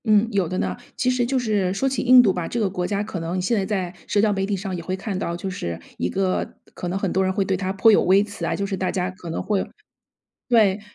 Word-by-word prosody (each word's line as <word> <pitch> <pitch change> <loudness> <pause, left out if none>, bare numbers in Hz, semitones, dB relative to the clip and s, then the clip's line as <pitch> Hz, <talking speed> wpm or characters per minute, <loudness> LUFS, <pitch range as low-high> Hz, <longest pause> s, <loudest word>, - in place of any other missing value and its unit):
嗯， 215 0 +4
有 195 -5 +1
的 185 +3 -3
呢， 95 - -1 0.2
其 255 - +1
实 250 -1 +1
就 265 +1 0
是 210 -6 +1
说 270 - 0
起 270 - -1
印 255 -1 +8
度 195 -5 +3
吧， 180 -2 -3
这 240 - -3
个 210 - +2
国 180 -1 -2
家 205 0 -1
可 200 -4 -5
能 170 +3 -2
现 185 +6 +1
在 200 - +1
在 190 -4 -2
社 205 - +1
交 210 0 +3
媒 195 -1 -1
体 200 -1 -1
上 190 -1 -4
也 175 - -5
会 185 +2 -3
看 195 0 -4
到， 170 -4 -2
就 195 - -5
是 85 - -4 0.2
一 - - -1
个 190 -1 -1 0.2
可 180 - -5
能 180 +2 -1
很 195 -2 -1
多 190 - +2
人 190 - +1
会 195 +1 0
对 190 - 0
它 185 0 -2
颇 200 +4 +5
有 210 - +5
微 195 +3 +5
词 205 -1 -8
啊， - - 0
就 200 - -2
是 200 0 -2
大 185 0 -1
家 180 -1 -1
可 185 -2 -10
能 165 - -3
会 205 -3 0 0.9
对， 215 -5 +4
195 Hz, 305 characters per minute, -23 LUFS, 185-210 Hz, 0.9 s, 印